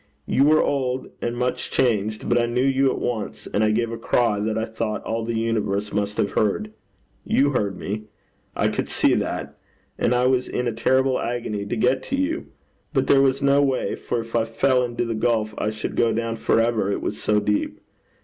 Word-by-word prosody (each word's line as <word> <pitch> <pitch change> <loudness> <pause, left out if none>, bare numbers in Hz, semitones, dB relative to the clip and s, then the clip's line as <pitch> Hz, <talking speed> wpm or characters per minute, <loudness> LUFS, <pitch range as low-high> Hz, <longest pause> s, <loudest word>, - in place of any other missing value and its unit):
You 135 - +3
were 155 +1 +5
old 130 -2 -1
and 120 0 -2
much 125 0 -2
changed, 110 -4 0
but 120 0 +3
I 120 - +1
knew 125 +2 0
you 135 0 +3
at - - -2
once, 115 -4 -3
and 105 - 0
I 110 - +3
gave 115 +2 0
a 115 - -5
cry 115 -2 +1
that 110 +1 -1
I 110 - 0
thought 110 -1 -3
all 115 0 -2
the 115 +1 -2
universe 105 -3 -1
must 105 0 -1
have 100 - +1
heard. 210 - 0 0.5
You 140 +1 +2
heard 100 -7 -1
me. 105 +2 -4 0.5
I - - +2
could - - -2
see - - +2
that. - - -3 0.4
And 125 - +2
I 125 +1 +2
was 125 0 +2
in 125 - -2
a - - +1
terrible 130 +3 +2
agony 110 -4 -3
to - - -2
get 125 +3 +2
to 275 - -2
you. 290 +5 -1 0.5
But - - +2
there 135 - +5
was 135 0 +2
no 140 +1 +4
way, 135 -2 0
for - - -3
if 115 0 -8
I 115 - +3
fell 125 +3 +2
into 120 0 -2
the 115 - -2
gulf 110 -1 0
I 105 - 0
should 110 0 -5
go 115 -1 +3
down 115 0 -1
for 115 - +2
ever, 115 -3 +1
it - - -2
was 105 - -3
so 105 0 +2
deep. 105 0 -1
115 Hz, 215 wpm, -23 LUFS, 110-130 Hz, 0.5 s, were